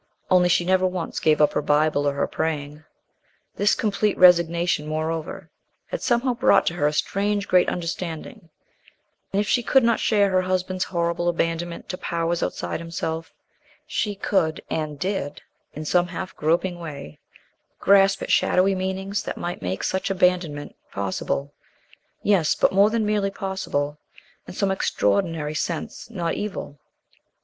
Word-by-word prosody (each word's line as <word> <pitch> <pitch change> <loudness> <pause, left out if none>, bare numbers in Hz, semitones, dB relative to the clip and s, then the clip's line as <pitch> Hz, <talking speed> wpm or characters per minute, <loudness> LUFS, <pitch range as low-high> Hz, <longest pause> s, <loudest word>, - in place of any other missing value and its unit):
Only 180 -1 +5
she 175 0 +3
never 185 0 +3
once 180 -2 -4
gave 155 -1 +3
up 150 - +4
her - - +1
Bible 145 0 +2
or - - -3
her 140 - 0
praying. 150 -1 -3 0.7
This 205 +1 +3
complete 210 -1 0
resignation, 170 -3 +4
moreover, 155 +1 -4 0.4
had - - -4
somehow 245 +1 +1
brought 245 +2 +4
to - - 0
her 150 -4 +1
a - - +1
strange 200 +5 0
great 180 -1 +4
understanding, 165 -1 -5 0.8
and 195 - +1
if 205 - 0
she 245 - +2
could 265 +2 +3
not 230 -1 +3
share 205 -3 +2
her 185 0 +3
husband's 185 0 -1
horrible 170 0 -1
abandonment 170 0 -2
to 185 - -4
powers 170 0 -1
outside - - -3
himself, 165 -1 -4 0.5
she 205 -2 -2
could, 165 -5 0
and 155 -2 -2
did, 185 -4 -3 0.3
in 155 +1 -6
some 175 +3 +2
half 185 +1 -6
groping 175 +3 0
way 145 - -8 0.6
grasp 195 0 +4
at - - -3
shadowy 190 +2 +3
meanings 190 +2 -2
that - - -5
might 175 +1 -4
make 95 +1 -3
such 190 - -1
abandonment 180 -6 0 0.2
possible, 100 +8 -3 0.7
yes, 190 -7 +3
but - - +2
more 200 +2 +5
than 220 -1 0
merely 210 -1 +1
possible 170 -7 -3 0.5
in - - -9
some 195 -1 +1
extraordinary 165 -5 0
sense 165 +6 -4
not 175 -7 -2
evil. 195 -8 -5
175 Hz, 150 wpm, -24 LUFS, 155-195 Hz, 0.8 s, Only